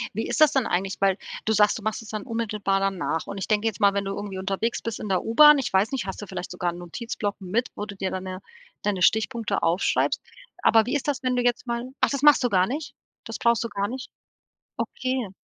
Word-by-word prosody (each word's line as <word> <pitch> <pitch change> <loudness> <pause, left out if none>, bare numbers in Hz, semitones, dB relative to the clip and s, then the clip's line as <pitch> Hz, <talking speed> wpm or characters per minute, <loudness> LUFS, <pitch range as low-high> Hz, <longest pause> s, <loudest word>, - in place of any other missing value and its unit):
Wie - - -2
ist - - -1
das 305 - +7
dann 265 -4 +2
eigentlich, 190 +1 -1
weil 195 0 +3 0.3
du 220 - 0
sagst, 210 +1 +4
du - - -9
machst 220 +1 -2
es 225 - -12
dann 215 -1 -4
unmittelbar 210 -4 -1
danach, 190 -4 -1
und 200 - -6
ich 190 - -4
denke 215 +1 +2
jetzt 220 -1 -3
mal, 200 -1 +5
wenn 200 0 -1
du 195 - -3
irgendwie 200 -2 -5
unterwegs 195 +5 -2
bist 230 -1 -4
in 210 - -5
der 185 - +1
U-Bahn, 295 +6 +7
ich 265 - -2
weiß 200 +7 +3
nicht, 260 -6 -2
hast 190 - -5
du 205 - -7
vielleicht 180 - -6
sogar 175 -1 -1
'n 175 - -9
Notizblock 205 +3 -4
mit, 215 +7 -1
wo 210 - -4
du 200 -1 -9
dir 190 -1 -2
dann 185 0 -4
'ne 185 0 -6 0.4
deine 200 -3 -1
Stichpunkte 220 +3 +1
aufschreibst? 170 +3 +1 0.4
Aber 225 -1 +5
wie 255 - -1
ist 290 - -2
das, 275 - -1
wenn 255 -1 0
du 245 - +1
jetzt 245 +1 0
mal 235 +2 -3
ach, - - +3
das 280 -1 -2
machst 295 -3 +6
du - - +2
gar 185 -2 +3
nicht? 285 +7 -5 0.3
Das - - -5
brauchst 235 0 +2
du - - -1
gar 200 +1 -2
nicht? 260 +1 -6 0.7
Okay. 255 -6 -2
210 Hz, 255 wpm, -25 LUFS, 195-240 Hz, 0.7 s, das